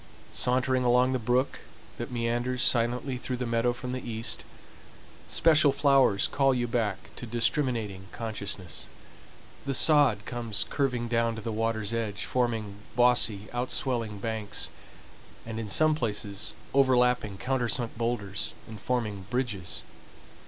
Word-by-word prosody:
Sauntering 130 +1 +2
along 125 +1 +4
the 130 - 0
brook 125 +4 0 0.4
that - - -4
meanders 120 +2 0
silently 125 +2 +2
through 125 0 -3
the 125 - -3
meadow 115 +1 +1
from 125 +1 -6
the 130 0 -3
east, 115 -1 -3 0.8
special 155 -3 +5
flowers 135 -8 +4
call 135 -2 +2
you 120 -1 0
back 115 -3 -2
to 120 - -6
discriminating 115 -5 0
consciousness. 100 -7 -5 0.8
The 135 - +1
sod 140 -9 +4
comes 115 -4 -2
curving 125 -4 -1
down 115 -1 +1
to 110 - -6
the 115 - -3
water's 110 -1 -1
edge, 110 -3 -2
forming 115 -5 -1 0.2
bossy 120 -4 +4
outswelling 120 -3 -1
banks, 110 -1 -2 0.7
and 115 0 -5
in 110 -2 -5
some 155 +9 +4
places 105 -6 -2 0.2
overlapping 125 -6 +3
countersunk 120 -1 -1
boulders 110 -4 -3
and 110 -1 -9
forming 105 -7 -2
bridges. 115 -8 -2
120 Hz, 130 wpm, -28 LUFS, 110-125 Hz, 0.8 s, special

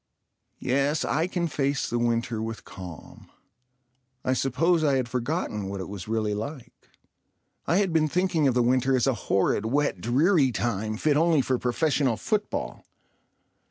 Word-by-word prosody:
Yes, 140 +4 0
I 160 +4 0
can 175 -2 -1
face 140 -2 -1
the 120 - -1
winter 115 -1 0
with 110 0 -5
calm. 90 -4 -11 1.0
I 130 - +2
suppose 155 +6 +1
I 140 -3 +3
had 130 -2 0
forgotten 120 - -2
what 100 0 -5
it 95 - -5
was 100 -1 -7
really 110 -1 0
like. 115 +6 -7 0.8
I 170 - +3
had 195 -4 +1
been 155 -1 +3
thinking 170 -2 +1
of 130 - +1
the 125 - +3
winter 130 +2 +2
as 125 - +2
a 135 - +2 0.2
horrid 100 +2 +2
wet, 140 -7 0
dreary 140 - +3
time 110 -2 -2
fit 150 +4 +2
only 160 -2 +4
for 130 -1 0
professional 130 -1 +1
football. 210 - -2
130 Hz, 160 wpm, -26 LUFS, 115-155 Hz, 1.0 s, only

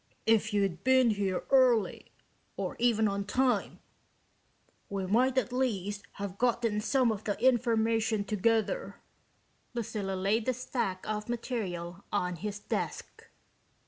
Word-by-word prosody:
If 225 -1 +3
you'd 195 -4 0
been 260 -2 +5
here 195 -3 -1
early 255 -5 +3 0.5
or - - -3
even 225 -2 +3
on 200 0 -1
time 245 +1 0 1.1
we 195 -1 -2
might 250 +7 +2
at 250 -1 +1
least 205 -6 -1
have 200 -1 -6
gotten 235 -3 +1
some 255 +1 +2
of 215 -1 -4
the 205 - -2
information 225 -3 +2
together." 225 - 0 0.8
Lucilla 205 -4 -3
laid 205 +5 0
the 255 - +1
stack 230 -7 -3
of 210 +1 -3
material 195 -7 -4
on 180 -3 -1
his 205 +3 -4
desk. 205 - -5
220 Hz, 125 wpm, -30 LUFS, 200-240 Hz, 1.1 s, been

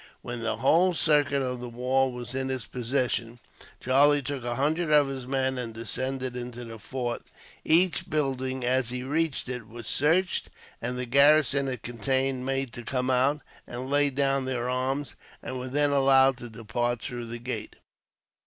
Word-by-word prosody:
When 120 0 -5
the 115 -1 -1
whole 170 +9 +3
circuit 145 -3 +2
of 125 -1 -3
the 125 0 -6
walls 130 +2 0
was 120 0 -6
in 135 0 -2
his 130 -4 -3
possession, 120 -1 -1 0.4
Charlie 140 +3 +4
took 135 -1 -4
a 120 0 -2
hundred 155 +5 0
of 150 -2 +5
his 130 -2 -6
men, 130 -1 0
and 115 -2 -5
descended 130 +2 -3
into 120 0 -6
the 115 -1 -9
fort. 120 0 -4 0.4
Each 170 +2 +3
building, 130 -3 -1
as 130 -1 +1
he 125 0 -4
reached 150 +1 -1
it, 125 -3 -5
was 115 0 -10
searched; 165 - +1 0.3
and 125 +2 -3
the 125 - -2
garrison 140 +1 +4
it 125 -4 -4
contained 130 +2 0
made 135 -3 -1
to 120 - -7
come 125 +2 -1
out, 135 +4 +2 0.3
and 125 +2 -6
lay 145 0 +4
down 135 0 +1
their 125 -2 -2
arms, 130 +2 -2 0.3
and 130 - -5
were 125 - -5
then 145 +2 +2
allowed 135 -1 +5
to 120 -1 -9
depart 115 +2 -2
through 120 -1 -5
the 120 +1 -5
gate. 120 +2 -5
130 Hz, 175 wpm, -27 LUFS, 120-140 Hz, 0.4 s, of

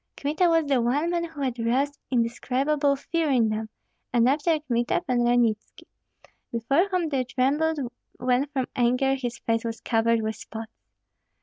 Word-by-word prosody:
Kmita 310 +5 +1
was 330 -1 +3
the 275 -4 +2
one 285 +8 +1
man 340 -1 0
who 320 -4 -9
had 255 -3 -2
roused 265 +5 0
indescribable 270 +4 +1
fear 325 +3 -1
in 240 -5 +3
them, 215 0 -3 0.4
and 240 -1 +3
after 305 +4 +2
Kmita, 240 -1 0
Pan 250 -3 +1
Ranitski, 240 -3 +1 0.7
before 275 - +2
whom 360 -4 0
they 270 -3 0
trembled 280 +6 +1 0.4
when 250 +3 +1
from 270 -3 -2
anger 250 +2 +2
his 250 -3 -3
face 225 0 -1
was 230 -1 -4
covered 230 -1 +1
with 220 0 -2
spots. 220 0 -8
255 Hz, 160 wpm, -25 LUFS, 235-290 Hz, 0.7 s, was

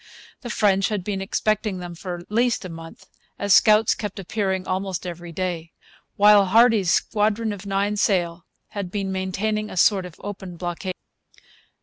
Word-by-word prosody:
The 240 - -7
French 195 -3 +2
had 210 -4 -2
been 195 0 -3
expecting 210 0 -1
them 175 -1 -7
for 175 +1 -6
at 175 +3 -14
least 235 -2 +1
a - - -6
month; 165 0 -11 0.3
as 200 -1 +2
scouts 215 +3 +5
kept 210 -2 -6
appearing 190 -1 -2
almost 185 0 -2
every 175 -1 -7
day, 170 -2 -4 0.4
while 205 -1 +6
Hardy's 220 -3 +4
squadron 215 0 +1
of 200 0 -9
nine 200 +1 0
sail 175 -4 0 0.2
had 200 -4 -5
been 195 0 -3
maintaining 200 +3 -2
a - - -8
sort 190 0 +3
of 175 - -14
open 190 -3 -7
blockade. 180 +2 -4
195 Hz, 160 wpm, -23 LUFS, 180-210 Hz, 0.4 s, while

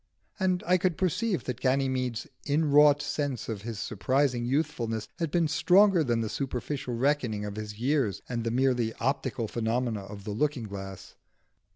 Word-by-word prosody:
And 185 -2 +1
I 180 +1 +3
could 180 -2 0
perceive 190 +2 0
that 125 -1 -5
Ganymede's 130 -2 0 0.2
inwrought 150 0 +5
sense 145 -3 -2
of 110 -4 -4
his 115 0 -5
surprising 130 +3 0
youthfulness 120 -6 -1
had 165 -2 0
been 170 +1 +2
stronger 180 +4 +5
than 120 -4 +1
the 110 - -1
superficial 130 0 -3
reckoning 125 -5 0
of 105 -1 -5
his 105 -1 -6
years 125 -4 0
and 120 -2 -3
the 115 - -1
merely 120 -2 +1
optical 130 -3 -1
phenomena 115 -1 -1
of 100 0 -9
the 105 - -5
looking 135 +3 0
glass. 95 -2 -8
130 Hz, 160 wpm, -28 LUFS, 115-150 Hz, 0.2 s, inwrought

